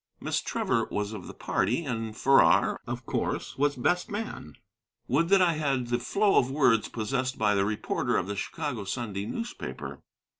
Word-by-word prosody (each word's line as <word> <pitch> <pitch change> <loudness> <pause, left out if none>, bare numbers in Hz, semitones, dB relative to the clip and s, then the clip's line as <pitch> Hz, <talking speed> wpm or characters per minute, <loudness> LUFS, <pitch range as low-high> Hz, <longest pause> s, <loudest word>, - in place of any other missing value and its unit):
Miss - - -1
Trevor - - 0
was 105 +1 -2
of 100 -4 -7
the - - -8
party, 125 +9 0
and 115 -4 -3
Farrar, 135 0 +4
of - - -5
course, - - -2
was 145 +1 +1
best 175 +8 0
man. 205 - -5 0.5
Would 165 +7 +2
that 195 -1 +6
I 170 -2 +3
had 135 -6 -1
the 120 0 +1
flow 200 - +2
of 125 - 0
words 125 -6 +3
possessed 125 +4 -2
by 105 -1 +3
the 100 -1 +2
reporter 105 +1 -1
of 90 - 0
the 100 +1 -4
Chicago 125 - -4
Sunday 100 -1 -3
newspaper! 230 - -6
125 Hz, 175 wpm, -28 LUFS, 105-155 Hz, 0.5 s, that